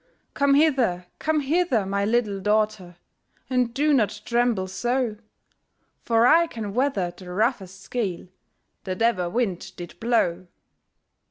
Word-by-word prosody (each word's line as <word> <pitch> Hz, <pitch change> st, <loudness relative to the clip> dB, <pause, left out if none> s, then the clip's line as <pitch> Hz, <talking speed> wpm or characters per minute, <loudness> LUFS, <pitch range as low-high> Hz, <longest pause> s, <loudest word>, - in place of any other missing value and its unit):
'Come 280 Hz, -1 st, +3 dB
hither! 260 Hz, -, +2 dB
come 310 Hz, -1 st, +1 dB
hither! 285 Hz, -, +1 dB
my 200 Hz, +1 st, -1 dB
little 215 Hz, -3 st, 0 dB
daughtèr. 210 Hz, -3 st, 0 dB, 0.6 s
And 250 Hz, -2 st, +1 dB
do 295 Hz, +5 st, +2 dB
not 215 Hz, -5 st, +1 dB
tremble 235 Hz, -5 st, +1 dB
so; 240 Hz, +4 st, -1 dB, 0.8 s
For 230 Hz, 0 st, +3 dB
I 330 Hz, +6 st, +5 dB
can 215 Hz, -8 st, -6 dB
weather 245 Hz, -9 st, 0 dB
the 185 Hz, -1 st, -11 dB
roughest 195 Hz, -2 st, -2 dB
gale 195 Hz, -8 st, -2 dB, 0.6 s
That 185 Hz, +3 st, -2 dB
ever 195 Hz, -7 st, +1 dB
wind 195 Hz, -3 st, -2 dB
did 175 Hz, -1 st, -10 dB
blow.' 185 Hz, -7 st, 0 dB
225 Hz, 125 wpm, -24 LUFS, 190-250 Hz, 0.8 s, I